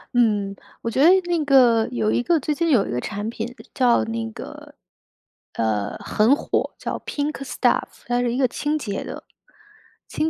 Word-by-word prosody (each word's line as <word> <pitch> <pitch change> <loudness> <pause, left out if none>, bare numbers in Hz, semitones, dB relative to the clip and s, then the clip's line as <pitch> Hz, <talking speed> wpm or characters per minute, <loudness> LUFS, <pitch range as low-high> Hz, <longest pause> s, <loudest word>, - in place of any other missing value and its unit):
嗯。 205 -4 +2 0.3
我 230 - -3
觉 260 - +1
得 320 - +8 0.2
那 340 -3 +1
个 245 -5 +5
有 215 -3 0
一 - - +1
个 330 +6 +2
最 300 +2 -1
近 335 +3 0
有 240 -10 +3
一 - - -4
个 120 - -1
产 205 - -4
品 235 +1 -5 0.2
叫 245 - +3
那 115 0 -3
个 - - -10 0.8
呃， 105 -2 -1
很 220 +5 +2
火， - - -2
叫 - - -4
pink 290 +1 -2
staff。 265 - -1
它 245 0 +1
是 240 -1 0
一 250 - -2
个 260 -2 +3
清 295 +5 -2
洁 210 -9 -4
的 - - -8 0.8
清 315 - -1
240 Hz, 235 characters per minute, -22 LUFS, 205-280 Hz, 0.8 s, 得